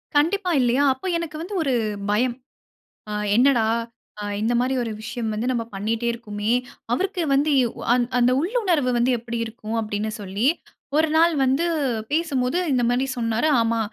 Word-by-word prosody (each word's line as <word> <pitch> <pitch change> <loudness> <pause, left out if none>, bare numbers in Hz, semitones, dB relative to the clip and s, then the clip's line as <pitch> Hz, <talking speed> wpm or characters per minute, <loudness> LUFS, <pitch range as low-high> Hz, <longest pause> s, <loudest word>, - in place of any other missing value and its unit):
கண்டிப்பா. 360 +6 +2
இல்லையா? 250 +3 +2
அப்ப 260 - -13
எனக்கு 335 -2 -5
வந்து 380 +5 -6
ஒரு 275 -4 0 0.4
பயம். 240 +4 +1 0.7
ஆ - - -3 0.2
என்னடா? 245 -1 +4 0.6
அ - - -4 0.2
இந்த 225 +3 +1
மாரி 255 +2 +1
ஒரு 230 - -4
விஷயம் 225 +1 -4
வந்து 220 +3 -2
நம்ம 235 -2 -1
பண்ணிட்டே 220 +4 -1
இருக்கோமே. 210 -2 -3 0.4
அவருக்கு 380 - -1
வந்து 285 +3 +2
யு 245 - +2 0.3
அன் 245 -1 +2
அந்த 245 +1 +4
உள்ளுணர்வு 350 - +1
வந்து 240 +2 +2
எப்பிடி 235 0 -5
இருக்கும்? 225 0 -6
அப்டீன்னு 215 0 -3
சொல்லி 200 +5 -1 0.5
ஒரு 320 +1 +4
நாள் 335 +1 +5
வந்து 270 +6 +2 0.5
பேசும்போது, 290 -3 0
இந்த 255 -2 +2
மாரி 250 +2 +1
சொன்னாரு. 230 +4 0
"ஆமா. 230 0 +1
245 Hz, 160 wpm, -23 LUFS, 230-300 Hz, 0.7 s, நாள்